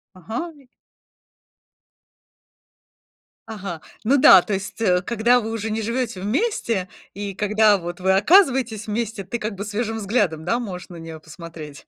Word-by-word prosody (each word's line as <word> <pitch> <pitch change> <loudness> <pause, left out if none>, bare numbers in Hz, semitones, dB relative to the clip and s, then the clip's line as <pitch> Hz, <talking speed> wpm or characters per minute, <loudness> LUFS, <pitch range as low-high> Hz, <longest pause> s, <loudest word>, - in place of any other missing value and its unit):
Ага, 225 - -5
и 275 -3 -21 2.8
Ага, 195 -7 -6 0.2
ну 270 +6 +3
да, 190 -7 +8
то 205 - -4
есть, 200 +3 -5
э, 180 -4 +3
когда 235 +4 +2
вы 225 0 -5
уже 225 -1 -3
не 220 +1 -2
живете 230 -2 -2
вместе, 225 - -1 0.2
и 200 0 -5
когда 210 +1 +3
вот 175 0 -7
вы 190 - +2
оказываетесь 245 - +3
вместе, 215 -1 -3
ты 235 +6 -5
как 215 -1 -4
бы 200 - -5
свежим 220 +2 -3
взглядом, 200 -7 0
да, 230 +8 0
можешь 185 -7 -7
на 175 - -10
неё 165 -1 -9
посмотреть. 160 -2 -11
210 Hz, 150 wpm, -22 LUFS, 185-230 Hz, 2.8 s, да